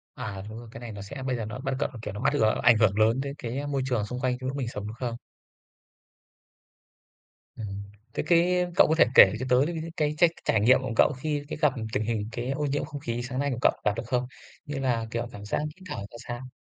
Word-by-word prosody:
À, 100 -3 -5
đúng 110 - -8
rồi, 120 - -11
cái 115 - -9
này 120 -2 -7
nó 100 -1 -7
sẽ 130 +7 -7
bây 130 -1 -1
giờ 115 -3 -3
nó 120 +4 -6
bắt 135 -1 -2
cận - - 0
nó 115 - -8
kiểu 105 - -5
nó 105 - -6
mách - - +2
gờ 110 -1 +3
ảnh 120 -2 +7
hưởng 105 -2 +3
lớn 115 +4 +4
đến 140 0 -4
cái, 125 -2 -4
a, 145 - -4
môi 140 -2 0
trường 120 -5 0
xung 125 +4 -5
quanh 125 -1 0
trong 130 0 -5
lúc 135 +2 -3
mình 130 -4 -2
sống 105 -3 -5
đúng 110 - -6
không? 120 -1 -3 2.4
Ừm. 100 -2 -5 0.3
Thế - - -1
cái 180 +1 +4
cậu - - +7
có 160 - +2
thể - - +7
kể 95 - +9
cho 130 - -2
tớ 125 +1 +5
những 165 -1 -4
c - - -30
cái 150 -1 +1
trách 170 0 +5
trải 110 - +3
nghiệm 125 +5 +6
của 130 -3 -3
cậu 150 - +5
khi 150 0 -2
cái - - -5
gặp 150 -4 +4 0.2
tình 110 - +1
hình 110 -2 -2
cái 125 +3 -3
ô 150 +2 -1
nhiễm 145 +1 0
không 145 - -7
khí 120 +1 -2
sáng 130 +1 -4
nay 140 0 +1
của 120 - -2
cậu - - +6
gặp 105 - +4
được - - -3
không? 125 0 0 0.4
Như 145 -2 -4
là, 120 -4 0
kiểu, 120 0 -2
cảm 100 0 -9
giác - - -1 0.2
hít 185 - -17
thở - - -3
ra 115 - -11
sao? 120 +1 -5
125 Hz, 275 wpm, -27 LUFS, 115-140 Hz, 2.4 s, kể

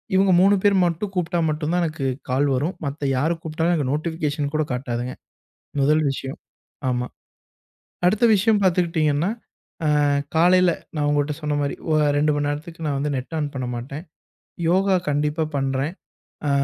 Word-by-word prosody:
இவுங்க 190 0 +4
3 200 +1 +5
பேர் 205 -1 +4
மட்டும், 175 +4 -2
கூப்பிட்டா 175 -1 0
மட்டும் 155 +2 -1
தான் 180 - +2
எனக்கு 155 -3 -3 0.3
கால் 140 +3 +2
வரும். 150 +8 -1
மத்த 140 +1 -3
யாரு 160 +6 +2
கூப்பிட்டாலும் 160 +2 -1
எனக்கு 145 -6 0
நோட்டிஃபிகேஷன் 150 -2 -2
கூட 155 - +1
காட்டாதுங்க. 125 0 -3 0.7
முதல் 155 +3 +3
விஷயம், 135 0 -5 0.5
ஆமா. 125 0 -1 1.0
அடுத்த 210 +6 +3
விஷயம் 210 +1 +3
பார்த்துக்கிட்டீங்கனா, 165 -3 +2 0.6
அ - - +3 0.5
காலையில 180 +2 +5 0.3
நான் 145 -1 +1
உங்கட்ட 145 0 +1
சொன்னமாரி, 145 -1 -1 0.2
ஒ - - +3 0.2
2:00 150 +1 +3
மணி 145 0 0
நேரத்துக்கு 160 +3 -5
நான் 145 -2 0
வந்து 145 +1 -1
நெட் 130 +5 -5
ஆன் 150 -1 -1
பண்ண 130 -2 -3
மாட்டேன். 140 +7 -6 0.7
யோகா 190 +2 +3
கண்டிப்பா 150 +2 0
பண்றேன். 135 +3 -1 0.6
அ - - +2
155 Hz, 150 wpm, -23 LUFS, 145-175 Hz, 1.0 s, 3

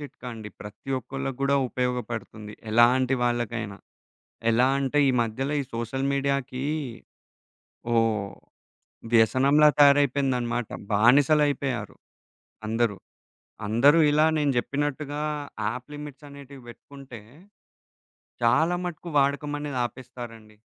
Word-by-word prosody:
చిట్కా 145 -3 -10
అండి. 110 -2 -8
ప్రతి 105 +6 -9
ఒక్కళ్ళకి 135 0 -5
కూడా 140 0 +3
ఉపయోగపడుతుంది. 120 -4 -4 0.2
ఎలాంటి 125 +3 +4
వాళ్ళకైనా. 120 -4 -2 0.7
ఎలా 120 +3 +3
అంటే, 140 +1 0
ఈ - - +5
మధ్యల 115 +5 -3
ఈ - - -1
సోషల్ 120 +4 -2
మీడియాకి 140 -2 -1 1.3
ఓ - - +3 1.2
వ్యసనంలా 135 +6 +5
తయారైపోయిందన్నమాట. 135 -5 +3 0.2
బానిసలయిపోయారు, 140 +3 +2 0.7
అందరూ. 115 -2 0 0.7
అందరూ 140 +9 +5
ఇలా 150 +1 +4
నేను 145 -2 +1
చెప్పినట్టుగా 145 +2 -2 0.5
యాప్ 125 +4 -5
లిమిట్స్ 145 -1 -9
అనేటివి 140 -1 -12
పెట్టుకుంటే 130 +1 -12 1.2
చాలా 160 +9 +3
మటుకు 175 0 -6
వాడకం 140 +1 +1
అనేది 145 -3 -4
ఆపేస్తారండి. 115 -4 -11
130 Hz, 95 wpm, -25 LUFS, 120-140 Hz, 1.3 s, ఈ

